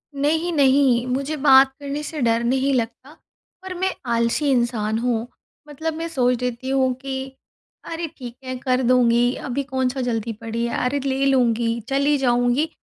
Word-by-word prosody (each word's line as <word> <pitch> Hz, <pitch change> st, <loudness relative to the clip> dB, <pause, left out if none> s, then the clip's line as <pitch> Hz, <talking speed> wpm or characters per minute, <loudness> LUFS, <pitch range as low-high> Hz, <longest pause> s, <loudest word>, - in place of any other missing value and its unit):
नहीं, 315 Hz, +5 st, 0 dB
नहीं, 270 Hz, -4 st, +3 dB
मुझे 275 Hz, +4 st, -2 dB
बात 270 Hz, -1 st, +7 dB
करने 285 Hz, +1 st, -4 dB
से 305 Hz, +1 st, -6 dB
डर 230 Hz, -1 st, +2 dB
नहीं 265 Hz, +3 st, +1 dB
लगता, 240 Hz, +3 st, -3 dB, 0.5 s
पर 375 Hz, 0 st, -6 dB
मैं 375 Hz, 0 st, 0 dB, 0.2 s
आलसी 235 Hz, +5 st, +1 dB
इंसान 235 Hz, -4 st, 0 dB
हूँ। 235 Hz, -1 st, -1 dB, 0.4 s
मतलब 315 Hz, +2 st, -4 dB
मैं 330 Hz, +1 st, -4 dB
सोच 250 Hz, -6 st, 0 dB
लेती 250 Hz, +1 st, -3 dB
हूँ 265 Hz, -1 st, +2 dB
कि, 265 Hz, -1 st, -5 dB, 0.5 s
"अरे 330 Hz, 0 st, -4 dB
ठीक 245 Hz, -3 st, -8 dB
है, 255 Hz, 0 st, -4 dB
कर 255 Hz, 0 st, 0 dB
दूँगी, 245 Hz, 0 st, +3 dB, 0.2 s
अभी 275 Hz, +3 st, -1 dB
कौन-सा 260 Hz, -1 st, -2 dB
जल्दी 230 Hz, -2 st, -2 dB
पड़ी 230 Hz, +1 st, -3 dB
है, 235 Hz, -, -3 dB
अरे, 280 Hz, +3 st, 0 dB
ले 270 Hz, 0 st, 0 dB
लूँगी, 235 Hz, -3 st, +2 dB
चली 280 Hz, +2 st, +2 dB
जाऊँगी"। 245 Hz, +3 st, +1 dB
260 Hz, 165 wpm, -22 LUFS, 240-280 Hz, 0.5 s, बात